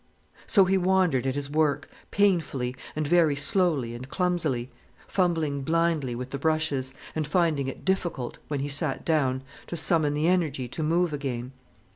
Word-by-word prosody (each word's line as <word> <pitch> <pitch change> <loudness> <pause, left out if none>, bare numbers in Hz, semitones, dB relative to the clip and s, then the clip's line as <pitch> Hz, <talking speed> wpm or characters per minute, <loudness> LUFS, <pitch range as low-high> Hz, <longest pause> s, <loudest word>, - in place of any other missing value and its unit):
So, 195 -3 +5
he 190 +1 +2
wandered 180 -8 +2
at 130 - -1
his 145 -1 -2
work, 145 -1 +1 0.2
painfully, 160 -11 +1 0.2
and 155 0 -1
very 165 -3 +4
slowly 140 -4 +2
and 125 +3 -8
clumsily, 160 -10 -1 0.4
fumbling 160 -6 0
blindly 160 -4 +1
with 125 +2 -6
the 140 - -4
brushes, 145 -4 0 0.2
and 155 -2 -1
finding 155 -4 +1
it 135 - -7
difficult, 175 -9 -1
when 145 -2 -2
he 140 - -2
sat 145 0 -1
down, 135 -5 +1 0.2
to 170 - -5
summon 155 -3 +1
the 150 +2 +1
energy 155 -8 +1
to 160 - -5
move 165 +1 +1
again. 130 -3 -4
150 Hz, 160 wpm, -27 LUFS, 135-170 Hz, 0.4 s, So